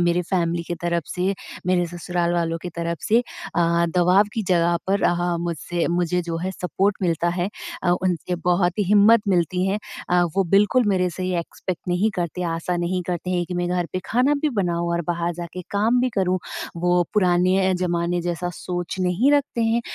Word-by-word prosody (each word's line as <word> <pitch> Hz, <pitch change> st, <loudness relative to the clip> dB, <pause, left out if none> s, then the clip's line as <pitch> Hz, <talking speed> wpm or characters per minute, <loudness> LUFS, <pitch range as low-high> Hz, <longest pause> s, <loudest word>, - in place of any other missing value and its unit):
मेरे 175 Hz, 0 st, +2 dB
फ़ैमिली 170 Hz, -2 st, 0 dB
के 175 Hz, -, -4 dB
तरफ़ 170 Hz, -1 st, 0 dB
से, 185 Hz, +2 st, 0 dB, 0.3 s
मेरे 180 Hz, -1 st, +2 dB
ससुराल 175 Hz, 0 st, -2 dB
वालों 165 Hz, -1 st, 0 dB
के 180 Hz, -, -4 dB
तरफ़ 170 Hz, -1 st, -2 dB
से 225 Hz, +2 st, +5 dB
अ, 195 Hz, -6 st, -5 dB, 0.4 s
दबाव 180 Hz, +3 st, +5 dB
की 225 Hz, -, -1 dB
जगह 170 Hz, -1 st, +3 dB
पर 195 Hz, +1 st, +1 dB
अ, 175 Hz, 0 st, +1 dB
मुझसे 170 Hz, 0 st, -2 dB
मुझे 175 Hz, 0 st, +1 dB
जो 165 Hz, -1 st, -3 dB
है 185 Hz, +3 st, -2 dB
सपोर्ट 190 Hz, +2 st, -1 dB
मिलता 170 Hz, -1 st, +1 dB
है 175 Hz, +1 st, -1 dB, 0.3 s
अ, 175 Hz, -, +2 dB
उनसे 180 Hz, 0 st, 0 dB
बहुत 180 Hz, +1 st, +2 dB
ही 205 Hz, -, +2 dB
हिम्मत 210 Hz, +4 st, +6 dB
मिलती 180 Hz, 0 st, +1 dB
है 195 Hz, +2 st, 0 dB, 0.3 s
अ, 180 Hz, 0 st, +4 dB
वो 195 Hz, -, +3 dB
बिल्कुल 210 Hz, +5 st, +4 dB
मेरे 185 Hz, -2 st, +2 dB
से 185 Hz, +2 st, -5 dB
ये 185 Hz, -1 st, 0 dB
एक्सपेक्ट 175 Hz, +1 st, -6 dB
नहीं 180 Hz, +5 st, +2 dB
करते, 175 Hz, 0 st, -2 dB
आशा 170 Hz, +1 st, -2 dB
नहीं 175 Hz, +1 st, -1 dB
करते 180 Hz, 0 st, -3 dB
हैं 175 Hz, -1 st, 0 dB
कि 180 Hz, -, -5 dB
मैं 175 Hz, 0 st, -1 dB
घर 180 Hz, -1 st, 0 dB
पे 185 Hz, -, -1 dB
खाना 255 Hz, +5 st, +2 dB
भी 305 Hz, -, +3 dB
बनाऊँ 170 Hz, -1 st, -1 dB
और 170 Hz, 0 st, 0 dB
बाहर 170 Hz, 0 st, 0 dB
जा 175 Hz, +1 st, -5 dB
के 180 Hz, 0 st, -6 dB
काम 220 Hz, +5 st, +2 dB
भी 255 Hz, -, +2 dB
करूँ। 185 Hz, -2 st, +1 dB, 0.4 s
वो 175 Hz, +1 st, +2 dB
पुराने 185 Hz, -1 st, +3 dB
अ, -, -, +3 dB
ज़माने 175 Hz, -1 st, 0 dB
जैसा 175 Hz, 0 st, -2 dB
सोच 175 Hz, -1 st, -4 dB
नहीं 185 Hz, +10 st, +2 dB
रखते 285 Hz, -5 st, +1 dB
हैं 225 Hz, +1 st, +2 dB
180 Hz, 200 wpm, -23 LUFS, 175-190 Hz, 0.4 s, हिम्मत